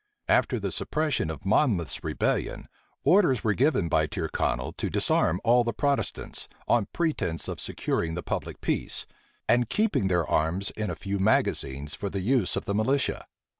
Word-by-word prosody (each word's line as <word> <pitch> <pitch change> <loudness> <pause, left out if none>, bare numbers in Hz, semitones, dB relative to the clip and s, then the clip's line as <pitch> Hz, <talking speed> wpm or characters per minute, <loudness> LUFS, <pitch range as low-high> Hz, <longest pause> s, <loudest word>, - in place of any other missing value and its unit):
After - - +2
the - - -3
suppression 150 - -1
of 80 +2 -7
Monmouth's 95 - +1
rebellion, - - -1 0.4
orders 170 - +4
were 105 - +2
given 125 - +2
by 80 -1 +2
Tyrconnel 85 -5 -2
to - - -2
disarm 80 +3 +2
all 120 +1 +5
the 115 0 -2
Protestants, 140 -1 -2 0.2
on 115 -4 +2
pretence 155 - -1
of - - -5
securing 80 0 -2
the 85 - -4
public - - -4
peace, - - 0 0.4
and 120 -1 +3
keeping 210 - +1
their 90 -3 +1
arms 85 +5 +1
in 110 -1 -3
a - - -3
few 100 0 -3
magazines 75 -8 +1
for 100 - -4
the 95 0 -3
use 115 -1 +1
of - - -3
the 100 - -1
militia. 130 +7 0
100 Hz, 165 wpm, -27 LUFS, 85-130 Hz, 0.4 s, all